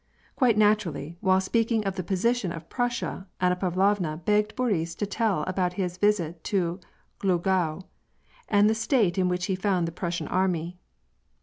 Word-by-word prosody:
Quite 245 -6 +3
naturally, 180 -7 +1
while 190 0 +4
speaking 225 +2 0
of 195 -1 -1
the 185 - -2
position 200 +2 0
of 165 -1 -8
Prussia, 240 -5 -2
Anna 180 0 +2
Pavlovna 185 -2 +1
begged 210 +5 +1
Boris 180 -10 -1
to 205 - -2
tell 205 -5 0
about 185 0 -1
his 180 -1 -3
visit 175 -6 +1
to 180 -2 0 0.4
Glogau, 180 -2 0 0.7
Mid 205 0 +5
the 220 - +3
state 220 -5 +1
in 180 -1 +2
which 180 0 -1
he 190 - -1
found 185 -2 0
the - - -4
Prussian 170 -2 -3
army. 180 -2 -1
185 Hz, 160 wpm, -26 LUFS, 175-210 Hz, 0.7 s, Mid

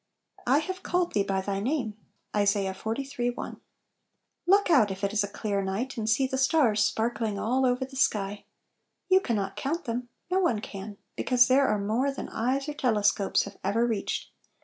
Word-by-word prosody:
"I 265 +3 +5
have 370 +5 -3
called 355 0 0
thee 205 - +3
by 195 -1 0
thy 195 0 -2
name." 240 -1 -1 0.4
ISA. 205 0 +3
tIiii 245 +4 -3
L, - - -10 0.9
LOOK 395 0 +4
out, 245 -10 +5
if 195 +1 -6
it 200 +1 0
is 210 -1 +2
a - - -2
clear 200 0 -2
night, 205 +8 -2
and 220 -2 -2
see 255 +4 +3
the 265 0 -2
stars 255 -6 +3
sparkling 225 -2 -1
all 255 +5 +1
over 250 +1 +1
the 270 +1 -13
sky. 205 -5 0 0.6
You 375 0 +6
can 235 - -1
not 195 -1 -2
count 325 +6 -2
them; 240 +1 -3 0.2
no 375 - +3
one 245 - +2
can, 200 0 -8 0.2
because 250 -1 +4
there 270 +2 +4
are 210 - +2
more 220 +7 0
than 275 - -6
eyes 260 +5 -1
or 300 - -3
telescopes 210 -7 +2
have - - -10
ever 215 +5 +2
reached. 220 -4 -2
230 Hz, 190 wpm, -28 LUFS, 205-270 Hz, 0.9 s, You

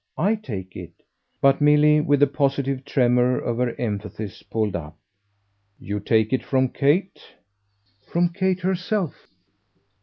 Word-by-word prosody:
I 195 +7 +2
take 100 - -7
it 85 -2 -9 0.3
" - - -49
But 135 +1 +4
Milly, 150 +1 +5
with 145 -1 +1
the - - +8
positive 140 -1 -1
tremor 125 -2 +2
of 120 -1 -3
her 125 -2 0
emphasis, 105 -3 -5
pulled 110 -3 -2
up. 75 -2 -7 0.8
"You 105 0 -4
take 110 +2 +1
it 130 - 0
from 130 -1 +1
Kate?" 160 +10 0 0.9
"From 175 +1 +2
Kate 185 +1 -1
herself." 185 -1 -2
135 Hz, 140 wpm, -23 LUFS, 110-150 Hz, 0.9 s, the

